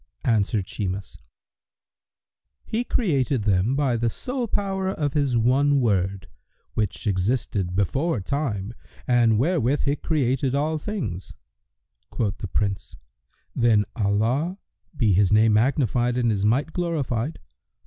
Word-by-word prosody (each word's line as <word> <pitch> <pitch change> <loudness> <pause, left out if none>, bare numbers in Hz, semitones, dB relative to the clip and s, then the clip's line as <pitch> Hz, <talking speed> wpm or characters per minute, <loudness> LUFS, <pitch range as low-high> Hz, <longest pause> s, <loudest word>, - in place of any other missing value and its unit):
Answered 105 -3 +1
Shimas, 95 0 -5 1.4
"He 225 +2 -2
created 140 - 0
them 100 +5 +2
by 135 -4 +1
the 115 0 +1
sole 250 - -3
power 195 -2 -1
of 150 -7 -2
His 140 -5 +1
one 140 +5 +3
Word,[FN#121] 95 -5 0 0.5
which 105 -3 -2
existed 95 -2 -1
before 135 - 0
time, 110 -3 -3 0.3
and 120 -3 +3
wherewith 145 0 +1
he 140 +1 +1
created 135 -4 0
all 155 +2 0
things." 160 - -5 0.7
Quoth 105 -4 -2
the 100 - -4
Prince, 100 +1 -2 0.6
"Then 110 -3 +3
Allah 115 - 0 0.4
(be 110 -7 +3
His 95 +1 +3
name 110 +1 +5
magnified 120 0 +2
and 120 -2 +2
His 100 -1 0
might 135 +9 +1
glorified!) 155 -6 -2
120 Hz, 120 wpm, -24 LUFS, 105-145 Hz, 1.4 s, name